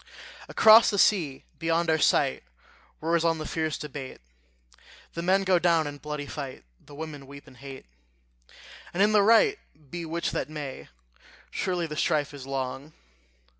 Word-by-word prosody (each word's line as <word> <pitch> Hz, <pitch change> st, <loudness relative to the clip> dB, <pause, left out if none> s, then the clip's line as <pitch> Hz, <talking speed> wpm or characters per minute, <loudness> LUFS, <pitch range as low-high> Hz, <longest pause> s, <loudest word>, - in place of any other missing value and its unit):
Across 220 Hz, +1 st, +7 dB
the 200 Hz, -, -1 dB
sea, 165 Hz, -10 st, +2 dB, 0.2 s
beyond 165 Hz, +1 st, 0 dB
our 160 Hz, -, +2 dB
sight, -, -, +2 dB, 0.6 s
Roars 165 Hz, +1 st, +1 dB
on 165 Hz, -1 st, +2 dB
the 155 Hz, -, -6 dB
fierce 160 Hz, -1 st, -2 dB
debate; 145 Hz, -3 st, -8 dB, 0.9 s
The 170 Hz, -, -4 dB
men 190 Hz, +3 st, +2 dB
go 185 Hz, -2 st, +3 dB
down 170 Hz, -2 st, +2 dB
in 145 Hz, 0 st, -7 dB
bloody 150 Hz, 0 st, -5 dB
fight, 140 Hz, -2 st, -7 dB, 0.2 s
The 145 Hz, -, -14 dB
women 145 Hz, -3 st, -8 dB
weep 140 Hz, +1 st, -12 dB
and 135 Hz, -4 st, -17 dB
hate; 135 Hz, +1 st, -10 dB, 1.1 s
And 195 Hz, -, +3 dB
in 210 Hz, -, +4 dB
the 210 Hz, -1 st, +5 dB
right 230 Hz, -, +4 dB, 0.3 s
be 175 Hz, -1 st, -5 dB
which 170 Hz, +1 st, -2 dB
that -, -, -3 dB
may, 150 Hz, -3 st, -7 dB, 0.6 s
Surely 180 Hz, -2 st, -2 dB
the 150 Hz, -2 st, -6 dB
strife 150 Hz, -3 st, 0 dB
is 135 Hz, -2 st, -9 dB
long! 135 Hz, +2 st, -4 dB
155 Hz, 160 wpm, -27 LUFS, 145-175 Hz, 1.1 s, Across